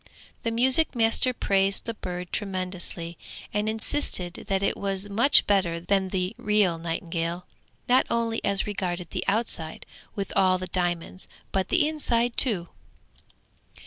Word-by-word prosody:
The 230 Hz, -, -1 dB
music 260 Hz, +6 st, +4 dB
master 225 Hz, +2 st, +3 dB
praised 195 Hz, -4 st, 0 dB
the 230 Hz, -, -3 dB
bird 180 Hz, -4 st, -6 dB
tremendously, 185 Hz, -4 st, -3 dB, 0.3 s
and 210 Hz, +1 st, 0 dB
insisted 220 Hz, -6 st, -2 dB
that 195 Hz, 0 st, 0 dB
it -, -, +1 dB
was 195 Hz, 0 st, -3 dB
much 235 Hz, +8 st, +5 dB
better 185 Hz, -5 st, +1 dB
than 190 Hz, +2 st, 0 dB
the 185 Hz, -1 st, -1 dB
real 205 Hz, -5 st, +2 dB
nightingale, 170 Hz, +1 st, -3 dB, 0.4 s
not 255 Hz, +1 st, +4 dB
only 230 Hz, -1 st, -1 dB
as 200 Hz, -1 st, +1 dB
regarded 180 Hz, -4 st, -3 dB
the -, -, -2 dB
outside 195 Hz, -7 st, 0 dB, 0.3 s
with 200 Hz, -1 st, -4 dB
all 185 Hz, -1 st, +4 dB
the 185 Hz, -, -5 dB
diamonds, 175 Hz, 0 st, -3 dB, 0.2 s
but 190 Hz, -1 st, -1 dB
the 320 Hz, -4 st, +3 dB
inside 245 Hz, -6 st, +1 dB
too. 190 Hz, -9 st, +3 dB
195 Hz, 140 wpm, -26 LUFS, 180-225 Hz, 0.4 s, much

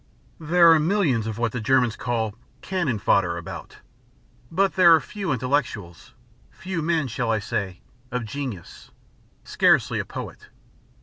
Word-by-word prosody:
"There 170 Hz, +1 st, +5 dB
are 160 Hz, -, +6 dB
millions 150 Hz, -, +1 dB
of 110 Hz, -1 st, -4 dB
what 115 Hz, -1 st, 0 dB
the 125 Hz, -, -4 dB
Germans 125 Hz, -1 st, +2 dB
call 115 Hz, -3 st, -2 dB, 0.3 s
'cannon 175 Hz, -, -1 dB
fodder' 90 Hz, -4 st, +1 dB
about. 85 Hz, -, -9 dB, 0.7 s
But 195 Hz, +3 st, +1 dB
there 175 Hz, -3 st, +7 dB
are -, -, +2 dB
few 195 Hz, +1 st, -5 dB
intellects 130 Hz, +1 st, 0 dB, 0.7 s
few 185 Hz, -2 st, -5 dB
men, 160 Hz, -3 st, 0 dB
shall 120 Hz, 0 st, -3 dB
I 110 Hz, -, +2 dB
say? 100 Hz, -4 st, -4 dB, 0.3 s
of 125 Hz, -2 st, -3 dB
genius, 120 Hz, -7 st, -7 dB, 0.5 s
scarcely -, -, +2 dB
a -, -, -1 dB
poet. -, -, -8 dB
130 Hz, 140 wpm, -24 LUFS, 110-165 Hz, 0.7 s, there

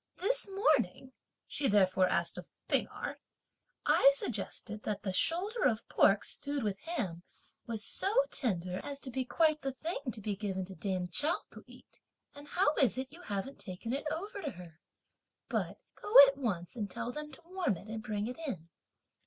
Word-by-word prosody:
This 425 Hz, +2 st, +1 dB
morning," 270 Hz, -, +1 dB, 0.3 s
she 285 Hz, -, +1 dB
therefore 190 Hz, -2 st, +4 dB
asked -, -, 0 dB
of -, -, -10 dB, 0.2 s
P'ing -, -, +2 dB
Erh, -, -, -6 dB, 0.7 s
"I 275 Hz, -, +7 dB
suggested 215 Hz, -4 st, -3 dB
that 205 Hz, -2 st, -3 dB
that 190 Hz, -2 st, -1 dB
shoulder 395 Hz, -, +1 dB
of 230 Hz, -3 st, +1 dB
pork 200 Hz, +1 st, +4 dB
stewed 285 Hz, -2 st, -3 dB
with 200 Hz, -2 st, -1 dB
ham 200 Hz, -, -3 dB, 0.5 s
was 220 Hz, -3 st, -3 dB
so 390 Hz, -, -1 dB, 0.2 s
tender 185 Hz, -, -1 dB
as 280 Hz, -1 st, -3 dB
to 260 Hz, -, -6 dB
be 260 Hz, +1 st, -1 dB
quite 310 Hz, +2 st, +2 dB
the 270 Hz, -, -2 dB
thing 325 Hz, +6 st, -3 dB
to 225 Hz, -, -8 dB
be 205 Hz, -1 st, -2 dB
given 190 Hz, -2 st, -3 dB
to 190 Hz, -, -10 dB
dame 185 Hz, 0 st, -2 dB
Chao 295 Hz, -, +2 dB
to -, -, -12 dB
eat; -, -, -16 dB, 0.3 s
and 285 Hz, 0 st, -12 dB
how 310 Hz, -2 st, +2 dB
is 255 Hz, -3 st, +3 dB
it 260 Hz, +1 st, -4 dB
you 345 Hz, -, -11 dB
haven't 210 Hz, -, -4 dB
taken 195 Hz, +6 st, -5 dB
it 285 Hz, +3 st, -2 dB
over 400 Hz, +6 st, -4 dB
to 305 Hz, -, -2 dB
her? 175 Hz, -7 st, -11 dB, 0.7 s
But -, -, -1 dB, 0.2 s
go 415 Hz, -, -6 dB, 0.2 s
at 275 Hz, -, -4 dB
once 205 Hz, -10 st, -3 dB
and 210 Hz, -4 st, -3 dB
tell 235 Hz, +6 st, -3 dB
them 300 Hz, +3 st, -6 dB
to 265 Hz, -, -13 dB
warm 360 Hz, -, -1 dB
it 200 Hz, -, -12 dB
and 220 Hz, 0 st, -5 dB
bring 210 Hz, -1 st, -2 dB
it 250 Hz, +6 st, -5 dB
in! 170 Hz, -, -5 dB
240 Hz, 185 wpm, -33 LUFS, 195-300 Hz, 0.7 s, I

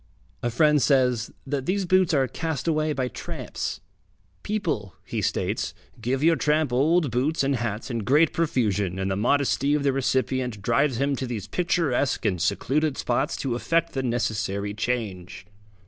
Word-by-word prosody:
A 120 Hz, -, 0 dB
friend 150 Hz, +4 st, +3 dB
says, 125 Hz, -3 st, +2 dB, 0.2 s
that 135 Hz, -1 st, -3 dB
these 195 Hz, +1 st, +1 dB
boots 185 Hz, -1 st, +3 dB
are 135 Hz, -4 st, +2 dB
cast 160 Hz, +2 st, -3 dB
away 155 Hz, -1 st, +1 dB
by 130 Hz, -3 st, -1 dB
tramps. 125 Hz, -, -5 dB, 0.6 s
People, 160 Hz, -, -2 dB
he -, -, -3 dB
states, -, -, -1 dB, 0.3 s
give 130 Hz, +5 st, -1 dB
your 165 Hz, +1 st, +5 dB
tramp 150 Hz, -1 st, +1 dB
old 150 Hz, +3 st, +3 dB
boots 140 Hz, +7 st, +1 dB
and 135 Hz, -1 st, +1 dB
hats 115 Hz, +2 st, -3 dB
in 115 Hz, -, -1 dB
great 145 Hz, +9 st, +3 dB
profusion, 105 Hz, -, 0 dB
and 95 Hz, 0 st, -1 dB
the -, -, 0 dB
modesty 140 Hz, +5 st, +2 dB
of 150 Hz, -, 0 dB
the 140 Hz, -1 st, +2 dB
recipient 130 Hz, -3 st, 0 dB
drives 125 Hz, +3 st, +2 dB
him 140 Hz, +2 st, +1 dB
to 130 Hz, -, -3 dB
these 110 Hz, -5 st, -4 dB
picturesque 165 Hz, -7 st, 0 dB
and 90 Hz, -4 st, +1 dB
secluded 135 Hz, -, 0 dB
spots 135 Hz, +5 st, 0 dB
to 135 Hz, -3 st, -2 dB
effect 165 Hz, +7 st, 0 dB
the 135 Hz, -, -1 dB
necessary 110 Hz, -5 st, -1 dB
change. 105 Hz, -6 st, -3 dB
130 Hz, 165 wpm, -25 LUFS, 115-150 Hz, 0.6 s, your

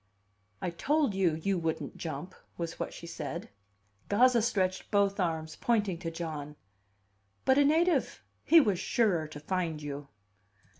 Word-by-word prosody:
"I 180 Hz, -, -1 dB
told 285 Hz, -, +1 dB
you 185 Hz, -5 st, +2 dB
you 185 Hz, +4 st, 0 dB
wouldn't 160 Hz, -1 st, -3 dB
jump," 180 Hz, +3 st, -5 dB, 0.2 s
was 165 Hz, -1 st, -4 dB
what -, -, -3 dB
she -, -, -9 dB
said. 150 Hz, -5 st, -5 dB, 0.6 s
Gazza 240 Hz, +3 st, +5 dB
stretched 190 Hz, -5 st, 0 dB
both 200 Hz, -1 st, +2 dB
arms, 160 Hz, -3 st, -1 dB
pointing 205 Hz, -7 st, 0 dB
to 170 Hz, -2 st, -3 dB
John. 155 Hz, -3 st, -5 dB, 0.9 s
"But 265 Hz, +1 st, +5 dB
a -, -, +6 dB
native! 330 Hz, +5 st, +2 dB, 0.2 s
He 330 Hz, -, +7 dB
was 205 Hz, -, +2 dB
surer 190 Hz, -8 st, +1 dB
to 150 Hz, -1 st, -9 dB
find 165 Hz, 0 st, -2 dB
you!" 145 Hz, -1 st, -6 dB
180 Hz, 145 wpm, -30 LUFS, 160-215 Hz, 0.9 s, He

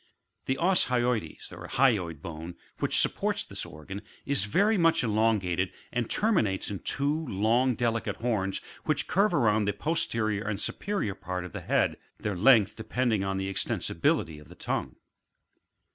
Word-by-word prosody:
The 130 Hz, -, 0 dB
os 180 Hz, +3 st, +2 dB
hyoides 120 Hz, -8 st, -1 dB
(hyoid 95 Hz, -, 0 dB
bone) 85 Hz, +1 st, -7 dB, 0.2 s
which -, -, +2 dB
supports -, -, 0 dB
this -, -, -5 dB
orgsm, 90 Hz, +6 st, -8 dB, 0.2 s
is 140 Hz, -8 st, +1 dB
very 205 Hz, -, +3 dB
much 165 Hz, -7 st, +3 dB
elongated, 105 Hz, -5 st, +1 dB, 0.2 s
and 120 Hz, -1 st, -1 dB
terminates 110 Hz, -, +1 dB
in 100 Hz, -, -4 dB
two 145 Hz, +3 st, -1 dB
long 115 Hz, +5 st, +2 dB
delicate 115 Hz, 0 st, -1 dB
horns 105 Hz, -5 st, -1 dB, 0.2 s
which -, -, +1 dB
curve 200 Hz, +3 st, +3 dB
round 105 Hz, -7 st, +3 dB
the 105 Hz, -, +1 dB
posterior 110 Hz, -, 0 dB
and 100 Hz, -2 st, -2 dB
superior 195 Hz, -, -2 dB
part 90 Hz, -1 st, -5 dB
of 90 Hz, -, -10 dB
the -, -, -5 dB
head, -, -, +1 dB, 0.2 s
their 105 Hz, -2 st, -2 dB
length 110 Hz, +1 st, +5 dB
depending 110 Hz, -1 st, 0 dB
on 95 Hz, 0 st, -1 dB
the 95 Hz, 0 st, -2 dB
extensibility 80 Hz, -4 st, 0 dB
of 75 Hz, -, -16 dB
the -, -, -12 dB
tongue. -, -, -3 dB
110 Hz, 150 wpm, -28 LUFS, 95-130 Hz, 0.2 s, length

